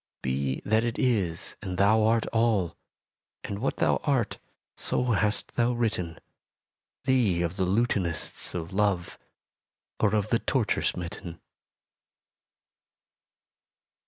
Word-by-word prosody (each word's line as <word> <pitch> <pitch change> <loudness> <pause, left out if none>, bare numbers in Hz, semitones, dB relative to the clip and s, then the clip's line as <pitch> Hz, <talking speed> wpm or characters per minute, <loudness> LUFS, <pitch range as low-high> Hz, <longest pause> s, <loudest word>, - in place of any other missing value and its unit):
Be 65 +1 -1
that 110 +2 +3
it 120 0 -2
is 100 -10 0
and 90 -1 -4
thou 105 +3 +4
art 115 0 +3
all: 110 -7 +2 0.7
And 100 - -4
what 135 - -1
thou - - +3
art 135 -7 0 0.4
so - - 0
hast 105 0 +1
thou 120 0 +3
written 100 -8 -1 0.9
Thee 110 -10 +2
of 85 +1 -2
the 95 -1 0
lutanists 95 -7 0
of 85 0 -4
Love, 100 -4 0 0.8
Or 110 -1 +3
of 105 -2 0
the - - +3
torture - - 0
smitten. 85 -1 -4
100 Hz, 115 wpm, -27 LUFS, 85-115 Hz, 0.9 s, thou